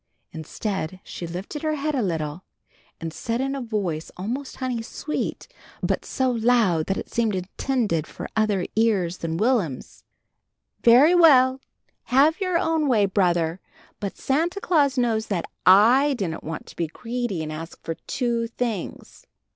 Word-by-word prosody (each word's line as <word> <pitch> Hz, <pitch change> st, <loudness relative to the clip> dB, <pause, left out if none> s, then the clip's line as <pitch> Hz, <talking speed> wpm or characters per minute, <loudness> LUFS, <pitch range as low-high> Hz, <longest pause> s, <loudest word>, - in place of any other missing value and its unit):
Instead 185 Hz, +2 st, -4 dB
she 170 Hz, -, -7 dB
lifted 185 Hz, -, -6 dB
her 310 Hz, -1 st, 0 dB
head 305 Hz, +1 st, -2 dB
a 265 Hz, -, +1 dB
little, 165 Hz, -3 st, -3 dB, 0.6 s
and 165 Hz, -1 st, -5 dB
said 230 Hz, +5 st, -3 dB
in 270 Hz, +1 st, -1 dB
a 275 Hz, -, -3 dB
voice 200 Hz, -9 st, -3 dB
almost 245 Hz, +9 st, -4 dB
honey 255 Hz, -3 st, -2 dB
sweet, 290 Hz, +6 st, -4 dB, 0.4 s
but -, -, 0 dB
so 260 Hz, -1 st, 0 dB
loud 225 Hz, -9 st, +2 dB
that 195 Hz, -, 0 dB
it -, -, -5 dB
seemed 225 Hz, -4 st, 0 dB
intended 190 Hz, -, -1 dB
for -, -, -7 dB
other 210 Hz, -4 st, +1 dB
ears 200 Hz, -6 st, +1 dB
than 165 Hz, 0 st, -3 dB
Will'm's, 210 Hz, -, -1 dB, 0.8 s
"Very 255 Hz, +8 st, +7 dB
well, 265 Hz, -6 st, +6 dB, 0.4 s
have 295 Hz, +8 st, +3 dB
your 365 Hz, -2 st, +1 dB
own 320 Hz, -2 st, +1 dB
way, 220 Hz, -6 st, +4 dB
brother, 175 Hz, -3 st, +1 dB, 0.4 s
but 200 Hz, -2 st, -5 dB
Santa 335 Hz, +8 st, 0 dB
Claus 295 Hz, -, +2 dB
knows 230 Hz, -3 st, +1 dB
that 180 Hz, -5 st, -2 dB, 0.2 s
I 245 Hz, +9 st, +6 dB
didn't 180 Hz, -8 st, -4 dB
want 160 Hz, +1 st, -6 dB
to -, -, -14 dB
be 170 Hz, -, -1 dB
greedy 230 Hz, -1 st, -4 dB
and 155 Hz, -, -5 dB
ask 160 Hz, +2 st, -7 dB
for 165 Hz, -, -3 dB
two 235 Hz, -2 st, -1 dB
things!" 230 Hz, -5 st, -5 dB
225 Hz, 155 wpm, -24 LUFS, 180-265 Hz, 0.8 s, Very